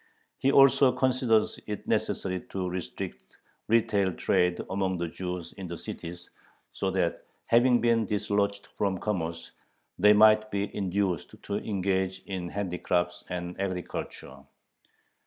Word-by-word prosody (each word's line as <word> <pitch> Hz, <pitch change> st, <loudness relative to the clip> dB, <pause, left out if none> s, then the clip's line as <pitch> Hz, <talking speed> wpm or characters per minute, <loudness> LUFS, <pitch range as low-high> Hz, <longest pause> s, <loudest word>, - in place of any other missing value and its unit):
He 135 Hz, -, +3 dB
also 135 Hz, -1 st, +6 dB
considers 125 Hz, -4 st, +2 dB
it 105 Hz, -1 st, -5 dB
necessary 95 Hz, -1 st, 0 dB
to 95 Hz, -2 st, -3 dB
restrict 90 Hz, 0 st, -5 dB, 0.5 s
retail 105 Hz, -4 st, +2 dB
trade 90 Hz, +1 st, +1 dB
among 95 Hz, -1 st, 0 dB
the 85 Hz, 0 st, -2 dB
Jews 90 Hz, 0 st, -5 dB
in 95 Hz, -2 st, -6 dB
the 85 Hz, 0 st, -6 dB
cities, 85 Hz, +1 st, -8 dB, 0.5 s
so 95 Hz, -, -1 dB
that, 90 Hz, -3 st, -1 dB, 0.2 s
having 120 Hz, 0 st, +4 dB
been 115 Hz, -2 st, +2 dB
dislodged 100 Hz, -1 st, 0 dB
from 100 Hz, -2 st, +1 dB
commerce, 85 Hz, -5 st, -3 dB, 0.5 s
they 105 Hz, +3 st, +7 dB
might 110 Hz, 0 st, +6 dB
be 100 Hz, 0 st, -3 dB
induced 95 Hz, -3 st, -1 dB
to 100 Hz, -, -2 dB
engage 95 Hz, -2 st, -1 dB
in 90 Hz, -3 st, -4 dB
handicrafts 90 Hz, -2 st, -1 dB
and 90 Hz, 0 st, -4 dB
agriculture. 90 Hz, -7 st, -5 dB
95 Hz, 125 wpm, -28 LUFS, 90-105 Hz, 0.5 s, they